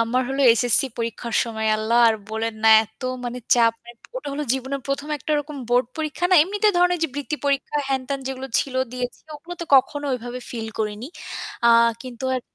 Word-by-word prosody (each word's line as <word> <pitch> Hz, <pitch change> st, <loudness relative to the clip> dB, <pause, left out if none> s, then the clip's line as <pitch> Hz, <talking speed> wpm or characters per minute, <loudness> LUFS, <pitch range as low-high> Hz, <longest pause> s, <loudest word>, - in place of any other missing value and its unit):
আমার 235 Hz, +3 st, +1 dB
হল 270 Hz, +1 st, -3 dB
এসএসসি 245 Hz, +4 st, +4 dB
পরীক্ষার 230 Hz, 0 st, -4 dB
সময় 220 Hz, -2 st, -3 dB
আল্লাহ 220 Hz, +2 st, +1 dB
আর 225 Hz, -, +2 dB, 0.2 s
বলেন 220 Hz, +1 st, -2 dB
না -, -, +7 dB, 0.2 s
এত 220 Hz, 0 st, -24 dB, 0.2 s
মানে 245 Hz, +1 st, -4 dB, 0.2 s
চাপ। 230 Hz, -1 st, +3 dB
অ্যা 240 Hz, -, -11 dB, 0.2 s
ওটা -, -, -5 dB
হল 285 Hz, -, -4 dB
জীবনের 265 Hz, +1 st, -4 dB
১ম 280 Hz, +2 st, -2 dB
একটা 305 Hz, -, -3 dB
রকম 295 Hz, 0 st, -9 dB
বোর্ড 245 Hz, +1 st, +3 dB
পরীক্ষা 310 Hz, +2 st, -3 dB
না -, -, +6 dB
এমনিতে 410 Hz, +5 st, +1 dB
ধরনের 355 Hz, 0 st, +3 dB
ওইযে 325 Hz, 0 st, 0 dB
বৃত্তি 290 Hz, +1 st, -3 dB
পরীক্ষা 280 Hz, +1 st, 0 dB
হ্যান-ত্যান 270 Hz, +1 st, -2 dB
যেগুলো 265 Hz, 0 st, -5 dB
ছিল 270 Hz, -, -5 dB, 0.2 s
দিয়েছি 250 Hz, -1 st, -4 dB, 0.2 s
ওগুলো 330 Hz, +4 st, -9 dB
তো -, -, -3 dB
কখনো 290 Hz, +2 st, +1 dB
ওইভাবে 245 Hz, 0 st, -5 dB
ফিল 225 Hz, -2 st, -5 dB
করিনি। 215 Hz, +2 st, -3 dB, 0.6 s
আ -, -, +6 dB, 0.3 s
কিন্তু 255 Hz, 0 st, -8 dB
আর 255 Hz, -, -1 dB
255 Hz, 190 wpm, -22 LUFS, 230-285 Hz, 0.6 s, না